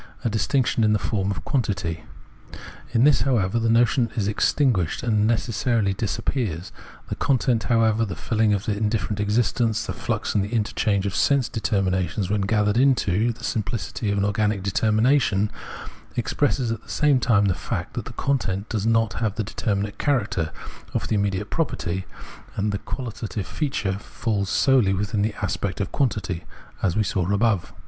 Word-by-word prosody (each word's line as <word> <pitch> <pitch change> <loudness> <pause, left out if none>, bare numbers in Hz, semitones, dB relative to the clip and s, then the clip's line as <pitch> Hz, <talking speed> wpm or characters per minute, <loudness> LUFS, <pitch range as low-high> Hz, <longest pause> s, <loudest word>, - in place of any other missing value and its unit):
a - - +3
distinction 120 +2 +1
in 105 0 +4
the - - +3
form 100 -2 -1
of 100 - -4
quantity. 100 - -1 0.9
In 120 0 +3
this, 145 0 +5
however, 115 -5 +1
the 115 0 +1
notion 120 +1 +3
is 105 -4 0
extinguished 105 - +1
and 105 -3 +2
necessity 115 -2 +1
disappears. 95 - -2 0.4
The - - -2
content, 125 -4 +1
however, 115 -2 +3
the 95 -6 -3
filling 110 +7 +1
of 100 -1 0
this 105 - 0
indifferent 105 -1 -1
existence, 115 +2 +1
the - - -3
flux 115 -2 -2
and 100 - +2
interchange 105 -2 0
of 100 - -2
sense 140 -6 +2
deter 110 -4 0
minations 95 +1 -1
when 105 -1 +1
gathered 105 +1 +1
into 120 -5 +3
the 115 - -12
simphcity 105 -1 -2
of 100 - 0
an 100 - +2
organic 105 -1 0
determination, 110 +1 +2 0.3
— - - -17
expresses 125 0 0
at 115 -1 -3
the - - -20
same 145 -3 +3
time 110 -4 +3
the 95 - +3
fact 80 - -4
that - - -4
the - - -8
content 105 -8 -1
does 110 -1 -1
not 115 -1 +2
have 110 -3 0
that 110 -2 -2
deter 105 0 -1
minate 100 +1 -3
character 105 - 0 0.4
(of - - -1
the - - +1
immediate 100 0 -1
property) 95 - -2 0.5
and 105 +1 0
the 100 - -2
quahtative 115 -5 -5
feature 105 -10 -2
falls 105 -2 -2
solely 125 -8 +3
within 105 +1 -1
the 105 0 0
aspect 95 +1 -2
of 100 - -2
quantity, 100 -10 -1 0.4
as 90 -3 +1
we 110 - +3
saw 95 -1 -1
above. 100 -5 +1
105 Hz, 170 wpm, -24 LUFS, 100-115 Hz, 0.9 s, this